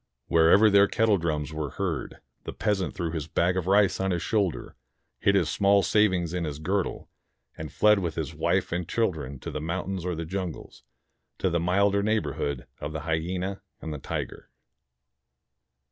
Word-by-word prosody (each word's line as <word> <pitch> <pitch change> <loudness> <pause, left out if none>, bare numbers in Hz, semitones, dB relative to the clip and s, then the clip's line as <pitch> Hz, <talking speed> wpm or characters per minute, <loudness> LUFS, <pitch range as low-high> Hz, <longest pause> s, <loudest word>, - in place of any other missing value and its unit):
Wherever 85 +6 +6
their 100 0 +6
kettledrums 85 -11 0
were 75 -2 -3
heard, 85 -9 -3 0.2
the - - -6
peasant 100 -3 -1
threw 85 -2 -2
his 80 -3 -4
bag 90 +2 +1
of 95 -2 -2
rice 100 -2 +4
on 95 0 0
his 90 -2 -1
shoulder, 100 -7 -1 0.4
hid 100 - +3
his 90 -5 +3
small 100 +2 +3
savings 95 -6 +2
in 90 -1 -1
his 75 -3 -4
girdle, 95 +5 -2 0.4
and 80 -2 -7
fled 105 -1 +4
with 85 -4 -3
his - - -3
wife - - 0
and 90 0 -3
children 80 - -1
to - - -5
the 75 - -4
mountains 90 +3 -3
or 90 -1 -2
the 80 +1 -4
jungles, 90 -1 -5 0.6
to 95 - 0
the 85 - +1
milder 100 +4 +2
neighborhood 100 - -1
of 75 +1 -5
the 80 - -4
hyena 90 +5 -2 0.2
and 80 - -5
the 75 - -6
tiger. - - -5
90 Hz, 170 wpm, -27 LUFS, 80-100 Hz, 0.6 s, Wherever